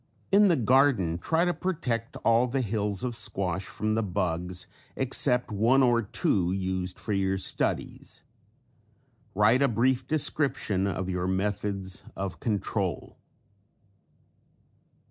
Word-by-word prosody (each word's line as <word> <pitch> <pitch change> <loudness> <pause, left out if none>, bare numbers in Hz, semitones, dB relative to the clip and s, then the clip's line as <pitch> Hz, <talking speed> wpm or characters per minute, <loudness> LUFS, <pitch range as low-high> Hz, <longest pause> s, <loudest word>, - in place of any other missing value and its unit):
In 205 +1 +6
the 175 - +4
garden 120 - +3
try 165 - +1
to 175 - +1
protect 130 -13 -3
all 115 +2 +4
the 130 +2 -1
hills 105 -3 -2
of 125 -2 -2
squash 95 -4 -2
from 110 +1 -2
the 110 - +1
bugs 90 -2 -2 0.3
except 125 -2 +1
one 115 +6 +3
or 120 -2 +3
two 95 -4 0
used 95 -1 -3
for 105 - -4
your 95 -1 +1
studies. 95 - -3 1.1
Write 105 +6 +4
a 140 - +5
brief 125 +2 +1
description 140 -10 0
of 95 -1 -3
your 90 -1 -2
methods 95 0 -2
of 95 -1 -5
control. 105 -5 -2
105 Hz, 125 wpm, -27 LUFS, 95-125 Hz, 1.1 s, In